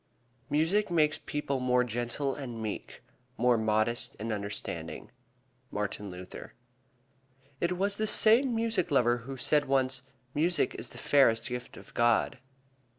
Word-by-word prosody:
"Music 165 +8 +2
makes 155 -3 +2
people 145 -3 -2
more 125 0 +3
gentle 120 +4 -2
and 125 -5 -6
meek, 110 -2 -6 0.3
more 125 +1 +4
modest 110 +1 0
and 110 +1 -3
understanding." 100 0 -5 0.6
Martin 105 -1 -3
Luther. 90 0 -9 1.0
It 170 +1 +1
was 200 +2 +1
this 215 0 +1
same 235 +4 +5
music 225 -6 0
lover 120 -4 +3
who 135 +3 -8
said 150 +3 +3
once, 135 -1 +1 0.3
"Music 170 +4 +1
is - - -6
the - - -12
fairest 115 -5 +3
gift 125 0 -6
of - - -14
God." 120 +2 +2
130 Hz, 135 wpm, -30 LUFS, 115-160 Hz, 1.0 s, same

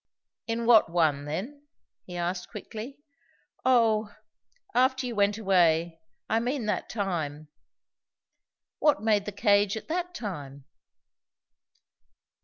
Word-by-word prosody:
"In 230 0 -2
what 230 -6 +6
one 155 -4 +1
then?" 255 - -6 0.4
he 180 -1 -7
asked 175 +1 -3
quickly. 225 +4 -8 0.7
"Oh 225 -4 +3 0.6
after 260 +1 +2
you 245 - -3
went 205 -1 +2
away. 170 -5 +2 0.3
I 225 - +2
mean 245 +1 -2
that 210 - -2
time." 155 -8 -3 1.3
"What 295 -9 +3
made 210 -2 +2
the 210 - -4
cage 200 0 +2
at 220 - -9
that 360 +2 -2
time?" 140 - -7
210 Hz, 110 wpm, -27 LUFS, 175-235 Hz, 1.3 s, what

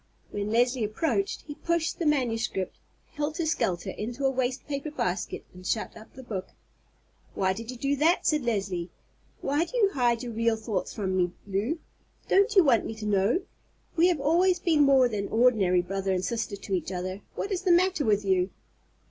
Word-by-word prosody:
When 205 0 -3
Leslie 245 +2 +2
approached 325 - -1
he 295 - -6
pushed 335 +2 -1
the 335 - 0
manuscript 230 -9 0 0.3
helter 305 +3 -2
skelter 190 - 0
into 240 +7 -4
a 270 - +4
waste 255 0 -1
paper 280 +1 -3
basket 190 - -3
and 180 0 -12
shut 215 +4 -2
up 220 0 -14
the 260 - -10
book. 195 -6 -5 0.8
"Why 190 -1 +1
did 225 +4 -8
you 250 - -5
do 275 +3 0
that?" 325 +5 +3
said 305 -1 +3
Leslie; 195 -7 -2 0.5
"why 290 +4 +1
do 350 +9 -5
you 410 -4 +4
hide 240 - +1
your 240 -2 -5
real 230 0 +2
thoughts 220 -4 -3
from 190 -3 -2
me, 180 -1 +1
Lew? 205 - -1 0.5
Don't 400 +3 +3
you 380 - +8
want 255 -7 +4
me 225 - -5
to 220 -1 -7
know? 205 - +2 0.5
We 340 +1 +5
have 350 -5 +1
always 350 +6 +3
been 320 -4 +2
more 270 -3 +6
than 205 -4 -3
ordinary 215 -7 +3
brother 195 +1 -2
and 185 0 0
sister 225 -3 -2
to 200 0 -6
each 180 0 -1
other. 185 +2 -4
What 400 - -3
is 370 - -1
the 375 -2 +2
matter 360 -2 +3
with 210 -4 +2
you?" 185 -1 +2
235 Hz, 190 wpm, -27 LUFS, 195-300 Hz, 0.8 s, you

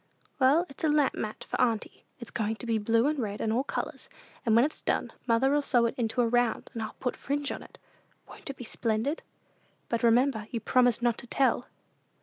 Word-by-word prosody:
"Well, 285 +6 +5
it's 275 - -11
a 315 - +3
lamp 295 -2 +3
mat 215 0 -5
for - - -1
auntie. 225 -3 -1
It's 235 - -10
going 220 -1 -1
to 230 - -7
be 225 -2 +1
blue, 230 +3 +2
and 300 0 +1
red, 210 -4 -3
and 220 - 0
all 250 +3 +1
colors; - - -4 0.3
and 225 -2 +3
when 235 +3 +6
it's 310 - -5
done, - - -1
mother'll 265 +5 +3
sew 245 -4 +3
it 230 - 0
into 240 0 0
a 235 - +3
round, 240 -1 +1
and 225 - -3 0.2
put 250 - -2
fringe 285 0 -2
on: - - -6 0.6
won't - - -10
it 275 - -6
be - - -7
splendid? 230 +6 -1 0.7
But 235 -1 0
remember, 235 -1 +3
you 235 - -3
promised 245 0 +3
not 240 -2 +2
to 245 - -9
tell!" 250 -1 +1
240 Hz, 205 wpm, -29 LUFS, 225-270 Hz, 0.7 s, when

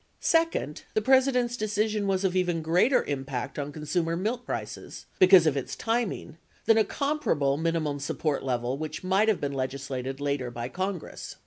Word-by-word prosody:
Second, 330 - +1
the 215 - +3
President's 260 -1 +3
decision 215 -1 -1
was 190 0 +1
of 190 -1 +1
even 175 -3 0
greater 180 - +3
impact 135 -1 -4
on 145 0 -3
con 150 +1 -8
sumer 165 +2 0
milk 235 +5 -2
prices - - -6
— - - -34
because 185 -2 +8
of 155 -3 +2
its 135 - -3
timing 225 -8 -2
— - - -34
than 225 0 +5
a - - +5
comparable 210 - 0
minimum 160 -2 -1
support 145 0 -1
level 125 0 -2
which 155 +3 -5
might 190 +4 +2
have 220 -4 +2
been 140 -1 -2
legislated 135 0 -4
later 140 -3 -1
by 120 0 -5
Congress. 185 0 -5
165 Hz, 180 wpm, -27 LUFS, 140-215 Hz, -, because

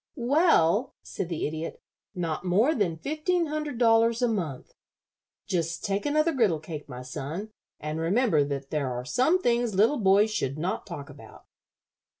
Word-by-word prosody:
"Well," 250 - +3
said 180 - -5
the 165 -3 -2
Idiot, 160 +2 -5 0.4
"not 170 -2 -3
more 205 - +3
than 185 - 0
fifteen 315 - 0
hundred 300 -3 -4
dollars 230 0 +3
a - - +4
month. 170 - -3 0.7
Just 165 -2 -2
take 200 +4 -1
another 305 +3 +2
griddle 215 - +2
cake, 155 -1 -8
my 125 0 -7
son, 155 +11 -6 0.3
and 150 +1 -4
remember 175 - +2
that 140 -1 -5
there 140 -4 -1
are 125 0 -4
some 260 - +2
things 235 - +1
little 225 +9 +3
boys 205 +1 +4
should 140 -10 -2
not 175 +6 -3
talk 145 -6 -7
about." 115 -6 -14
195 Hz, 155 wpm, -27 LUFS, 155-245 Hz, 0.7 s, a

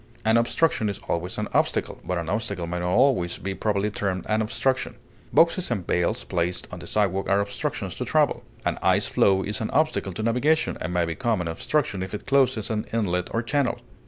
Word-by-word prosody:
An 110 +1 +4
obstruction 115 -1 +2
is 100 - -3
always 85 +2 -2
an - - -2
obstacle, - - 0
but 90 - -2
an 85 -1 -3
obstacle 100 -2 -2
may 90 +1 -3
not 90 0 -1
always 115 -6 +3
be 95 +1 -4
properly 105 +1 0
termed 95 -3 -2
an 110 0 +1
obstruction; 130 +4 -1 0.4
boxes 170 +2 +3
and 100 -7 -2
bales 90 -1 0
placed 90 +1 -1
on - - -7
the - - -9
sidewalk 95 -2 +1
are 100 - +4
obstructions 100 0 -3
to - - -2
travel; - - +2 0.2
an - - 0
ice - - +3
floe 95 -1 +3
is 105 +4 -2
an 110 - -2
obstacle 155 -10 +1
to 110 - -4
navigation, 130 +8 +2
and - - -3
may 90 -1 +1
become 110 +6 -1
an 90 - -2
obstruction 100 - -1
if 95 +3 -4
it - - -8
closes 130 -6 +2
an 105 -1 -2
inlet 90 -6 0
or 115 - -1
channel. 140 +1 0
105 Hz, 205 wpm, -25 LUFS, 90-120 Hz, 0.4 s, An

